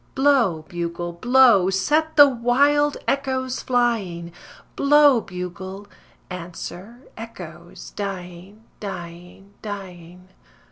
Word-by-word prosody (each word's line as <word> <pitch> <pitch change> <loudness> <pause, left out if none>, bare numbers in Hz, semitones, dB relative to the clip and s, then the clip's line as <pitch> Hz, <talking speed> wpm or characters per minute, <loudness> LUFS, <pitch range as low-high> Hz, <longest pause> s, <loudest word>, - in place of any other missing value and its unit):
Blow, 255 - +2
bugle, 175 0 -4
blow, 235 -1 +4
set 300 +12 0
the 290 -1 +9
wild 280 +4 +2
echoes 260 -2 -1
flying, 205 -9 -1 0.4
Blow, 285 -3 +5
bugle; 190 +2 -7 0.4
answer, 180 +5 -8
echoes, 230 +1 -10
dying, 195 +1 -7 0.2
dying, 180 0 -9
dying. 180 -3 -9
200 Hz, 85 wpm, -22 LUFS, 180-260 Hz, 0.4 s, the